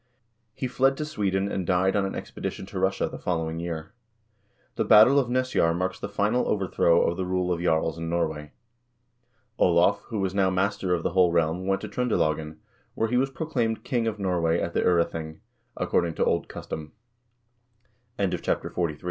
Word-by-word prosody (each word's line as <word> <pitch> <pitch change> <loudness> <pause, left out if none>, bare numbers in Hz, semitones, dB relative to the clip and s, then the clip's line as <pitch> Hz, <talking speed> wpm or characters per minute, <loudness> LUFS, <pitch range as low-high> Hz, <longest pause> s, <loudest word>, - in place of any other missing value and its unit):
He - - -3
fled 135 +2 +2
to 150 - -3
Sweden, 100 -10 -1
and 95 - -2
died 95 +1 +2
on 100 -1 +1
an - - -5
expedition - - -5
to - - -6
Russia - - +1
the - - -8
following 80 -2 -2
year. 85 +2 -5 0.8
The - - 0
battle 115 +7 +7
of 125 -3 -1
Nesjar 125 -10 +1
marks 95 +2 -2
the 100 - -5
final 105 +4 +1
overthrow 90 -4 +2
of 85 - 0
the 95 - -2
rule 90 0 0
of 85 - -4
jarls 80 -1 0
in 80 0 -4
Norway. 80 -3 -2 1.1
Olav, 90 +3 +4
who 115 - -4
was 95 -2 -1
now 95 -1 +2
master 95 0 0
of 85 - -4
the - - 0
whole 90 -1 +4
realm, 85 +2 0
went 95 0 +1
to 105 - -5
Tr0ndelagen, 80 -10 -1 0.4
where 115 - 0
he 125 - +1
was 135 +2 +2
proclaimed 125 -5 -2
king 120 -4 -1
of 110 -1 -2
Norway 85 -4 +1
at 85 - -3
the - - +1
0rething, 80 -2 0 0.4
according 85 -2 0
to - - +1
old - - 0
custo 75 -1 -7
95 Hz, 175 wpm, -26 LUFS, 85-105 Hz, 1.1 s, battle